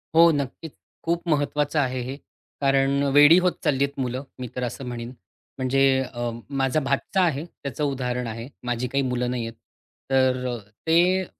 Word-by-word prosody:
हो, 170 Hz, +1 st, +8 dB
नक्कीच. 145 Hz, +1 st, -3 dB, 0.3 s
खूप 170 Hz, +1 st, -1 dB
महत्त्वाचं 150 Hz, 0 st, +1 dB
आहे 130 Hz, -2 st, 0 dB
हे 130 Hz, +3 st, -5 dB, 0.5 s
कारण 135 Hz, 0 st, +3 dB
वेडी 145 Hz, +4 st, +8 dB
होत 180 Hz, -, +4 dB
चाललीहेत 140 Hz, 0 st, +1 dB
मुलं 130 Hz, +1 st, -2 dB, 0.2 s
मी 125 Hz, -, -4 dB
तर 125 Hz, -, -2 dB
असं 125 Hz, +2 st, -4 dB
म्हणीन. 120 Hz, -1 st, -5 dB, 0.5 s
म्हणजे 130 Hz, +1 st, +1 dB, 0.3 s
अ, 120 Hz, 0 st, -2 dB, 0.2 s
माझा 135 Hz, 0 st, +1 dB
भाचा 140 Hz, +7 st, 0 dB
आहे 160 Hz, -3 st, +1 dB
त्याचं 145 Hz, -4 st, -6 dB
उदाहरण 125 Hz, -3 st, -1 dB
आहे. 115 Hz, +2 st, -6 dB, 0.2 s
माझी 120 Hz, 0 st, -1 dB
काही 140 Hz, +2 st, 0 dB
मुलं 125 Hz, -1 st, -1 dB
नाहीहेत, 115 Hz, -2 st, -3 dB, 0.6 s
तर 130 Hz, -1 st, +3 dB
अ, 120 Hz, -, -2 dB, 0.3 s
ते 180 Hz, +3 st, +4 dB
135 Hz, 160 wpm, -24 LUFS, 125-145 Hz, 0.6 s, हो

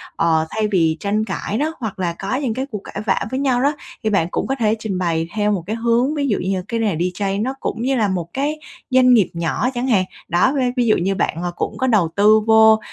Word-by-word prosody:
ờ, 160 Hz, -1 st, +2 dB
thay 215 Hz, -1 st, -1 dB
vì 165 Hz, -4 st, +2 dB
tranh 210 Hz, +2 st, -1 dB
cãi 205 Hz, +1 st, -3 dB
đó, 310 Hz, +5 st, -1 dB
hoặc 220 Hz, -6 st, -5 dB
là 175 Hz, -2 st, -1 dB
có 195 Hz, +6 st, -2 dB
những 260 Hz, -4 st, -1 dB
cái 260 Hz, +3 st, -3 dB
cuộc 210 Hz, -3 st, -5 dB
cãi 205 Hz, -, -6 dB
vã 190 Hz, -, +1 dB
với 260 Hz, -, -1 dB
nhau 260 Hz, -3 st, +1 dB
đó, 285 Hz, +2 st, +2 dB, 0.3 s
thì 220 Hz, -, +1 dB
bạn 195 Hz, -6 st, +1 dB
cũng -, -, -2 dB
có 270 Hz, -, 0 dB
thể 220 Hz, -1 st, +2 dB
trình 215 Hz, -4 st, -3 dB
bày 165 Hz, -2 st, -1 dB
theo 210 Hz, -1 st, +1 dB
một 190 Hz, -5 st, -1 dB
cái 220 Hz, -, -2 dB
hướng 235 Hz, +5 st, +1 dB
ví 285 Hz, -2 st, 0 dB
dụ 210 Hz, -, +1 dB
như 190 Hz, +1 st, -1 dB
cái 230 Hz, 0 st, -2 dB
nghề 210 Hz, -6 st, 0 dB
DJ 180 Hz, +4 st, -2 dB
này 195 Hz, 0 st, -1 dB
nó 255 Hz, +5 st, -1 dB
cũng 230 Hz, -, -3 dB
như 265 Hz, +2 st, +1 dB
là 220 Hz, -4 st, +2 dB
một 180 Hz, -3 st, -3 dB
cái 290 Hz, +3 st, -2 dB, 0.3 s
doanh 255 Hz, -1 st, +5 dB
nghiệp 215 Hz, -6 st, +4 dB
nhỏ 170 Hz, +8 st, -1 dB
chẳng 245 Hz, +1 st, -2 dB
hạn, 195 Hz, -7 st, +3 dB, 0.2 s
đó, 180 Hz, +10 st, +2 dB
ve 255 Hz, -2 st, +1 dB
ví 245 Hz, -, +2 dB
dụ 215 Hz, -, +4 dB
như 195 Hz, +3 st, 0 dB
bạn 165 Hz, -, -1 dB, 0.2 s
cũng -, -, -3 dB
có 260 Hz, -, 0 dB
đầu 205 Hz, -9 st, +3 dB
tư 210 Hz, +2 st, +5 dB
vô. 220 Hz, 0 st, +6 dB
215 Hz, 265 wpm, -20 LUFS, 190-250 Hz, 0.3 s, vô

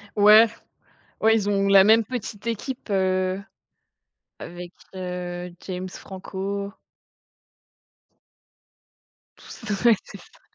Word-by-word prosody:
Ouais. 215 Hz, +2 st, +7 dB, 0.7 s
Ouais 225 Hz, +1 st, +4 dB
ils 205 Hz, -2 st, -1 dB
ont 200 Hz, -1 st, +1 dB
la 195 Hz, -1 st, +7 dB
même 220 Hz, +1 st, +5 dB
petite 215 Hz, -2 st, -7 dB
équipe, 235 Hz, +1 st, -5 dB
heu, 185 Hz, 0 st, 0 dB, 1.0 s
avec 175 Hz, 0 st, -9 dB, 0.2 s
heu, 180 Hz, -1 st, -5 dB, 0.2 s
James 185 Hz, 0 st, -5 dB
Franco. 195 Hz, +2 st, -6 dB, 2.7 s
Tous -, -, -13 dB
s 200 Hz, +4 st, -3 dB
ouais, 235 Hz, -2 st, +7 dB
c'est -, -, -12 dB
ça. -, -, -20 dB
195 Hz, 100 wpm, -24 LUFS, 185-215 Hz, 2.7 s, Ouais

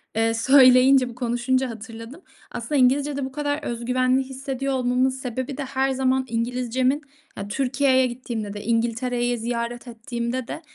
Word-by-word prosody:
eee, 225 Hz, 0 st, +2 dB
söyleyince, 255 Hz, +1 st, +6 dB
bu 235 Hz, -, -11 dB
konuşunca 250 Hz, +1 st, 0 dB
hatırladım. 230 Hz, -, -9 dB, 0.3 s
Aslında 235 Hz, +5 st, -4 dB
İngilizcede 280 Hz, +1 st, +2 dB
bu 265 Hz, -, -6 dB
kadar 290 Hz, +1 st, -2 dB
özgüvenli 255 Hz, +2 st, 0 dB
hissediyor 270 Hz, 0 st, -4 dB
olmamın 255 Hz, 0 st, +2 dB
sebebi 260 Hz, +1 st, -5 dB
de, 285 Hz, -, -3 dB
her 270 Hz, 0 st, 0 dB
zaman 260 Hz, 0 st, +1 dB
İngilizcemin 250 Hz, +4 st, -1 dB, 0.4 s
ya, 200 Hz, -, -5 dB
Türkiye'ye 260 Hz, +2 st, +2 dB
gittiğimde 235 Hz, -4 st, -5 dB
de 205 Hz, -, -7 dB
İngiltere'yi 240 Hz, +2 st, 0 dB
ziyaret 235 Hz, +1 st, -4 dB
ettiğimde 235 Hz, +1 st, -4 dB
de, -, -, -6 dB
255 Hz, 140 wpm, -23 LUFS, 235-265 Hz, 0.4 s, söyleyince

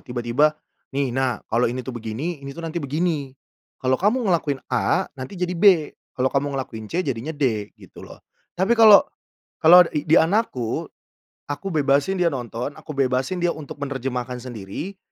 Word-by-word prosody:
tiba-tiba, 120 Hz, +5 st, +1 dB, 0.4 s
"nih 140 Hz, -2 st, 0 dB
nak 130 Hz, -2 st, -1 dB
kalau 115 Hz, +2 st, +2 dB
ini 125 Hz, +2 st, -4 dB
tuh 130 Hz, -, -5 dB
begini, 130 Hz, +10 st, -4 dB
ini 140 Hz, 0 st, -8 dB
tuh 170 Hz, -, -7 dB
nanti 165 Hz, +1 st, -3 dB
begini. 145 Hz, -2 st, -2 dB, 0.5 s
Kalau 130 Hz, 0 st, +2 dB
kamu 220 Hz, +7 st, +2 dB
ngelakuin 145 Hz, -5 st, 0 dB
A 165 Hz, +10 st, +2 dB
nanti 130 Hz, +9 st, -7 dB
jadi 180 Hz, 0 st, -2 dB
B, 175 Hz, -4 st, +4 dB, 0.3 s
kalau 130 Hz, +1 st, +1 dB
kamu 140 Hz, 0 st, 0 dB
ngelakuin 110 Hz, -5 st, -5 dB
C 180 Hz, +2 st, -1 dB
jadinya 135 Hz, +4 st, -3 dB
D" 115 Hz, -8 st, -1 dB
gitu -, -, -15 dB
loh. -, -, -12 dB, 0.4 s
Tapi 190 Hz, +6 st, +2 dB
kalau 215 Hz, -3 st, +9 dB, 0.6 s
kalau 175 Hz, +3 st, +9 dB
di 150 Hz, +1 st, -3 dB
di 160 Hz, -, +5 dB
anakku, 160 Hz, -, +1 dB, 0.6 s
aku 145 Hz, +7 st, -5 dB
bebasin 145 Hz, +4 st, +2 dB
dia 175 Hz, -, +3 dB
nonton, 125 Hz, +2 st, -4 dB
aku -, -, -10 dB
bebasin 130 Hz, +6 st, 0 dB
dia 175 Hz, 0 st, +1 dB
untuk 155 Hz, -2 st, -9 dB
menerjemahkan 125 Hz, -3 st, -4 dB
sendiri, 125 Hz, -, -7 dB
140 Hz, 165 wpm, -23 LUFS, 125-170 Hz, 0.6 s, kalau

